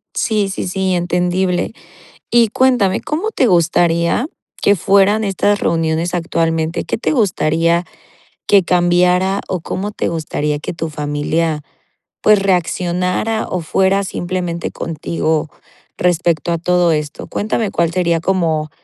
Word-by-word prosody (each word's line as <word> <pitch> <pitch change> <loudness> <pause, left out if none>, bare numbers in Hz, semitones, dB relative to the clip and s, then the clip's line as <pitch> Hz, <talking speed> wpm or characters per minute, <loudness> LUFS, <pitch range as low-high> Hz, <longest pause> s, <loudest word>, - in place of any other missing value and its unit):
Sí, 210 -3 0
sí, 190 - -4
sí, 190 0 -1
entendible. 180 +2 0 0.6
Y 235 -1 +4
cuéntame, 235 -6 +2
¿cómo 365 +9 -2
te 260 - +2
gustaría 170 - +2 0.3
que 205 - +4
fueran 200 +3 +3
estas 205 +1 +1
reuniones 165 +1 0
actualmente? 165 -1 -1
¿Qué - - -2
te 230 - -1
gustaría 170 - +1 0.6
que 200 -2 +5
cambiara 180 +2 +2
o 185 - -2
cómo 200 +5 -4
te - - -2
gustaría 150 -2 -2
que 150 - -5
tu 165 0 -4
familia, 150 +1 -1 0.6
pues 215 -1 +5
reaccionara 180 +3 0
o 180 - -2
fuera 190 +4 +1
simplemente 175 -2 -3
contigo 160 -1 -2 0.5
respecto 170 -2 +1
a 170 - 0
todo 175 0 +2
esto? 150 0 -3
Cuéntame 215 0 -2
cuál 170 -2 0
sería 170 -2 +1
como 165 -4 0
175 Hz, 125 wpm, -17 LUFS, 165-195 Hz, 0.6 s, que